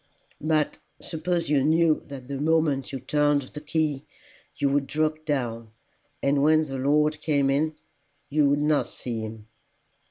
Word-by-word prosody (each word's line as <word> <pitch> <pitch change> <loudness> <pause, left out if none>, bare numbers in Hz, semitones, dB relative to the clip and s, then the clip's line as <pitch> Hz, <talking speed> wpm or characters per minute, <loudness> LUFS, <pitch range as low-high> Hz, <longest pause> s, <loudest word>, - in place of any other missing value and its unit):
"But 155 -1 0 0.2
suppose 170 +1 -2
you 140 -2 +2
knew 160 +1 +3
that 135 -3 -9
the 140 0 -4
moment 155 -3 +1
you 135 - -4
turned 145 +2 +2
the 150 +3 -9
key 150 -2 -1 0.5
you 140 0 +1
would 140 0 +1
drop 155 +1 -1
down, 115 -6 -2 0.5
and 140 0 +2
when 155 +2 +4
the 135 -2 -5
Lord 150 +2 +2
came 140 -3 +2
in 155 +3 +1 0.5
you 145 -1 +3
would 145 +1 +2
not 150 -1 +2
see 120 -3 -5
him." 110 -1 -7
145 Hz, 155 wpm, -26 LUFS, 135-155 Hz, 0.5 s, when